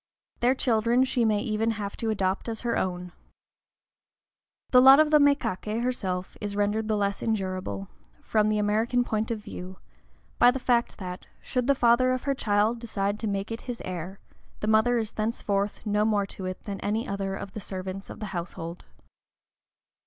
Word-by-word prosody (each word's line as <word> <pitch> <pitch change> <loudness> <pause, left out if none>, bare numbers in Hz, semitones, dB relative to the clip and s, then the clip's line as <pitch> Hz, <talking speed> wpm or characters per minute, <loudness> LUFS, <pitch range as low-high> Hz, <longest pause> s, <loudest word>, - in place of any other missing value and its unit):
Their 250 +2 +3
children 235 0 +2
she 255 -2 +1
may 210 -2 +2
even 225 -1 0
have 200 -1 -4
to 225 - -2
adopt 195 0 -1
as 225 -1 -4
her 240 -1 0
own. 180 -1 -2 1.6
The 250 - +7
lot 270 +2 +9
of 310 -1 +4
the 300 - +7
mékaké 235 -6 +1
herself 190 -7 -2
is 205 -1 -3
rendered 205 +2 0
the 215 -1 +1
less 200 -1 -1
endurable, 195 -3 -2 0.4
from 215 -1 +2
the 215 - +1
American 220 +4 +1
point 220 -2 -2
of 230 - -1
view, 185 -3 -8 0.6
by 245 - +8
the 255 - +1
fact 240 -2 +1
that, 180 -2 -7
should 250 -1 -2
the 280 - +4
father 255 +1 +4
of 255 - -3
her 280 - +1
child 215 -2 +1
decide 205 -3 -2
to 220 - -2
make 200 +1 -2
it 225 - -4
his 240 - -4
heir, 185 +1 -5 0.4
the - - -3
mother 220 +3 +4
is 220 -2 -2
thenceforth 210 -2 -2
no 210 0 +2
more 210 -2 +2
to 195 -1 -8
it 185 - -6
than 200 -2 -5
any 215 +3 -1
other 195 -1 -2
of 195 - -7
the - - -5
servants 190 0 -6
of - - -9
the 215 - -4
household. 170 -1 -6
215 Hz, 180 wpm, -27 LUFS, 195-235 Hz, 1.6 s, lot